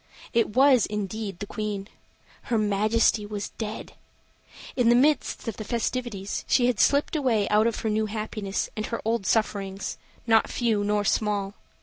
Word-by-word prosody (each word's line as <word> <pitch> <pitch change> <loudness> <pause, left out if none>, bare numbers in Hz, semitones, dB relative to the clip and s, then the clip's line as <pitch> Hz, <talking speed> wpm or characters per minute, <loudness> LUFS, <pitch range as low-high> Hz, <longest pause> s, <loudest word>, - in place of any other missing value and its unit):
It 230 -2 +1
was, 265 -3 +5
indeed, 210 -1 -4
the 205 - -5
Queen. 205 -2 -4 0.6
Her 235 - 0
Majesty 215 +1 +2
was 205 -1 -5
dead! 220 -1 -5 0.8
In 245 -3 +3
the 240 - +6
midst 285 0 +2
of 225 - -3
the 215 - -5
festivities 230 -3 -3
she 245 - +3
had 245 -3 +1
slipped 285 +3 +3
away 240 -9 +1
out 215 +2 +4
of 230 - -2
her 220 - -1
new 215 0 0
happiness 215 -2 -3
and 215 -1 -3
her 230 - -3
old 225 -3 0
sufferings, 200 -3 -1 0.3
not 225 -1 +4
few 225 -4 0
nor 205 0 +1
small. 205 -1 0
215 Hz, 160 wpm, -26 LUFS, 205-235 Hz, 0.8 s, the